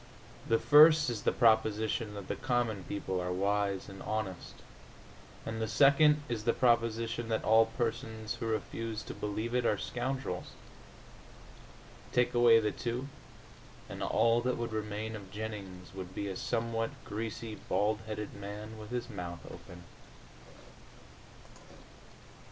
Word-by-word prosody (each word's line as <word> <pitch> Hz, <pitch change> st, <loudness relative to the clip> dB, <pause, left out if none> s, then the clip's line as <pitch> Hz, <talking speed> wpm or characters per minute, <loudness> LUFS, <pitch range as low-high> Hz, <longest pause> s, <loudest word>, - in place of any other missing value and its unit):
The 115 Hz, -, +4 dB
first 150 Hz, +1 st, +7 dB
is 110 Hz, -3 st, -4 dB
the -, -, +2 dB
proposition 110 Hz, -1 st, +2 dB
that 100 Hz, -2 st, -7 dB
the -, -, -2 dB
common 120 Hz, -6 st, -1 dB
people 95 Hz, -2 st, -3 dB
are 90 Hz, 0 st, -2 dB
wise 100 Hz, +1 st, 0 dB
and 95 Hz, -1 st, -10 dB
honest, 105 Hz, -4 st, -4 dB, 0.9 s
and 110 Hz, 0 st, -4 dB
the 110 Hz, -, 0 dB
second 150 Hz, +4 st, +5 dB
is 115 Hz, -3 st, -3 dB
the 115 Hz, -, +2 dB
proposition 115 Hz, -1 st, +1 dB
that 110 Hz, -, 0 dB
all 110 Hz, +1 st, +5 dB
persons 115 Hz, -2 st, -3 dB
who 115 Hz, -, -5 dB
refuse 110 Hz, 0 st, -3 dB
to -, -, -7 dB
believe 110 Hz, +3 st, -3 dB
it 125 Hz, 0 st, +2 dB
are 105 Hz, -, +2 dB
scoundrels. 125 Hz, -4 st, -3 dB, 1.6 s
Take 125 Hz, 0 st, +2 dB
away 120 Hz, -1 st, +7 dB
the 105 Hz, -1 st, 0 dB
two, 125 Hz, +5 st, -4 dB, 0.8 s
and -, -, -8 dB
all 115 Hz, +1 st, +3 dB
that 125 Hz, +1 st, 0 dB
would 115 Hz, -1 st, -3 dB
remain 110 Hz, +1 st, -3 dB
of 100 Hz, -3 st, -9 dB
Jennings 100 Hz, -4 st, -7 dB
would 95 Hz, -1 st, -8 dB
be 100 Hz, -, -3 dB
a 95 Hz, -, -4 dB
somewhat 115 Hz, +1 st, -1 dB, 0.2 s
greasy 110 Hz, +1 st, -5 dB
bald 105 Hz, 0 st, 0 dB
headed 105 Hz, -1 st, -5 dB
man 105 Hz, +2 st, -8 dB
with 105 Hz, -1 st, -9 dB
his 120 Hz, 0 st, -3 dB
mouth 85 Hz, -6 st, -7 dB
open. 90 Hz, 0 st, -11 dB
110 Hz, 140 wpm, -32 LUFS, 105-120 Hz, 1.6 s, first